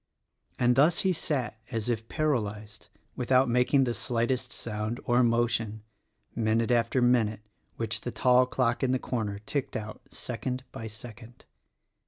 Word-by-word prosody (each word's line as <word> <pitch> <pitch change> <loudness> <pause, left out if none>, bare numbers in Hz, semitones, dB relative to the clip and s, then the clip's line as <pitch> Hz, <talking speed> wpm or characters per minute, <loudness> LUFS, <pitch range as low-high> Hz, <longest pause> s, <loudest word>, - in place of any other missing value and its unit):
And 125 0 +3
thus 160 +5 +4
he 190 -1 +2
sat 130 -9 -2
as 115 -3 -3
if 115 -2 -2
paralyzed 110 -8 -2
— - - -40
without 130 +1 +3
making 125 +3 +3
the 120 -2 0
slightest 120 +2 -1
sound 110 +1 -3
or 120 +1 +3
motion 115 -2 +1 0.2
— - - -49 0.2
minute 115 +1 +1
after 120 +1 +2
minute, 115 -4 +2 0.3
which 115 -2 -2
the - - -4
tall 125 +1 +4
clock 125 -2 0
in 130 -1 +2
the - - +3
corner 110 -5 -3
ticked 135 +7 -3
out 110 0 -7
second 125 +2 -4
by 110 - -6
second. 115 +1 -11
120 Hz, 155 wpm, -28 LUFS, 110-125 Hz, 0.3 s, thus